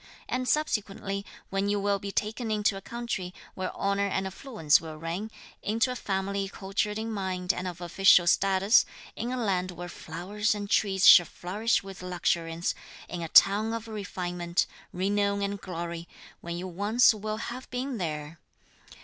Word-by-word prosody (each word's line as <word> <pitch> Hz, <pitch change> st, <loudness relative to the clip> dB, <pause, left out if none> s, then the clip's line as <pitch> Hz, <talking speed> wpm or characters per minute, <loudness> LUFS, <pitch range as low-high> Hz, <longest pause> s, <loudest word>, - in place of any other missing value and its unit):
And 255 Hz, 0 st, -1 dB
subsequently, 200 Hz, -8 st, -1 dB, 0.3 s
when 195 Hz, +1 st, 0 dB
you 205 Hz, 0 st, +1 dB
will 200 Hz, 0 st, +1 dB
be 200 Hz, 0 st, -5 dB
taken 220 Hz, +3 st, -2 dB
into 210 Hz, -1 st, +1 dB
a 195 Hz, -, -6 dB
country 225 Hz, -7 st, -4 dB, 0.2 s
where 185 Hz, -1 st, -3 dB
honour 200 Hz, 0 st, 0 dB
and 190 Hz, 0 st, -1 dB
affluence 190 Hz, -, +2 dB
will 160 Hz, -1 st, -7 dB
reign, 170 Hz, +7 st, -4 dB, 0.3 s
into 230 Hz, +4 st, +1 dB
a -, -, -3 dB
family 195 Hz, -2 st, -2 dB
cultured 195 Hz, +2 st, -2 dB
in 225 Hz, +1 st, -3 dB
mind 190 Hz, -3 st, -1 dB
and 185 Hz, -, -4 dB
of 180 Hz, 0 st, -6 dB
official 180 Hz, +1 st, +5 dB
status, 195 Hz, +4 st, +4 dB, 0.3 s
in 235 Hz, +3 st, -3 dB
a 255 Hz, -, -2 dB
land 190 Hz, -6 st, 0 dB
where 175 Hz, 0 st, -7 dB
flowers 195 Hz, +8 st, -2 dB
and 205 Hz, -1 st, -4 dB
trees 195 Hz, -2 st, +2 dB
shall 175 Hz, -3 st, +10 dB
flourish 210 Hz, +6 st, -1 dB
with 195 Hz, -1 st, -9 dB
luxuriance, 170 Hz, -2 st, -1 dB, 0.3 s
in 175 Hz, -, -5 dB
a 165 Hz, -, -3 dB
town 210 Hz, +6 st, +6 dB
of 230 Hz, 0 st, -4 dB
refinement, 180 Hz, -4 st, -2 dB, 0.3 s
renown 200 Hz, +2 st, 0 dB
and 200 Hz, 0 st, -3 dB
glory; 170 Hz, -1 st, -5 dB, 0.3 s
when 170 Hz, 0 st, -5 dB
you 180 Hz, +2 st, -4 dB
once 205 Hz, +7 st, +4 dB
will 215 Hz, 0 st, -4 dB
have 245 Hz, +3 st, -6 dB
been 250 Hz, -1 st, -3 dB
there..." 155 Hz, -2 st, -4 dB
195 Hz, 165 wpm, -28 LUFS, 180-215 Hz, 0.3 s, shall